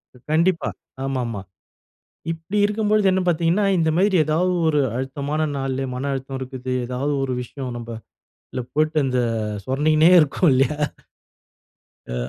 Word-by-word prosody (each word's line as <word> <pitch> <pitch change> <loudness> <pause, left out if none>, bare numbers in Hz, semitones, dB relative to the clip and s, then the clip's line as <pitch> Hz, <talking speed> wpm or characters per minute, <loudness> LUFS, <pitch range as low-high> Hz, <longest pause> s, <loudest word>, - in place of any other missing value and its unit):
க் 125 - -18
கண்டிப்பா. 165 +2 +2 0.3
ஆமாமா. 125 -6 -2 0.9
இப்பிடி 165 +5 -3
இருக்கும்பொழுது 210 0 +1
என்ன 190 - +2
பார்த்தீங்கன்னா, 170 +4 +2
இந்த 160 -1 +2
மாதிரி 195 +1 +3
ஏதாவது 165 +5 +1 0.2
ஒரு 150 -2 +2 0.2
அழுத்தமான 140 +4 -2
நாள்ல, 135 0 -2
மன 135 +3 -2
அழுத்தம் 135 0 -4
இருக்குது. 130 -1 -4
ஏதாவது 130 +4 -1
ஒரு 130 -1 -1
விஷயம் 125 0 -6
நம்ப 120 0 -8 0.6
உள்ள 125 - -3
போட்டு 155 +1 +1
அந்த 130 -1 0 0.5
சுரண்டிக்கினே 155 - +3
இருக்கும் 155 +3 +3
இல்லையா? 135 +3 +2 1.3
அ - - -4
145 Hz, 130 wpm, -22 LUFS, 130-165 Hz, 1.3 s, மாதிரி